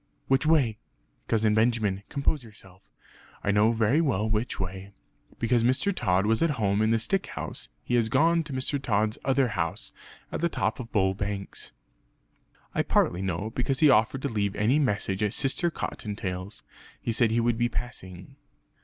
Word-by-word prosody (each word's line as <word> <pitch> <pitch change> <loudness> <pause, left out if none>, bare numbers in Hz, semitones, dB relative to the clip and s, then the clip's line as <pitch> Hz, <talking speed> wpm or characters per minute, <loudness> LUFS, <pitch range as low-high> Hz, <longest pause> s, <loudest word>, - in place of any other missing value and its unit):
"Which 135 +3 +2
way?" 135 -10 +3 0.5
"Cousin 110 -1 +2
Benjamin, 110 -3 +1
compose 140 0 -1
yourself. 95 -4 -14 0.6
I 100 - +2
know 105 +2 +4
very 115 +7 +2
well 110 - 0
which 110 +2 -1
way. 95 +1 -5 0.4
Because 120 0 +2
Mr. 130 +11 +2
Tod 95 +2 +1
was 110 +1 +2
at 165 - +3
home 100 -2 +1
in 110 - +3
the 115 - +3
stick 185 - -1
house - - -6
he - - -4
has 115 -2 +3
gone 165 +7 +3
to 150 - -7
Mr. 130 +2 -1
Tod's 110 -3 0
other 135 -1 +2
house, 85 -6 -3 0.4
at - - -3
the 170 - +2
top 110 -7 -1
of 120 -2 -7
Bull 95 -2 +2
Banks. 100 0 -5 1.0
I - - +1
partly 85 - +1
know, 95 +3 -2
because 130 +3 -1
he 150 -3 +7
offered 120 +3 +2
to - - +1
leave 100 -5 -1
any 120 +8 +2
message 105 -7 -1
at 105 -1 +1
Sister 140 +5 +1
Cottontail's; 100 - -5 0.4
he 115 - -2
said 115 -1 +3
he 115 +2 +1
would 115 0 +1
be 120 0 +2
passing." 95 -7 -7
110 Hz, 175 wpm, -27 LUFS, 100-130 Hz, 1.0 s, he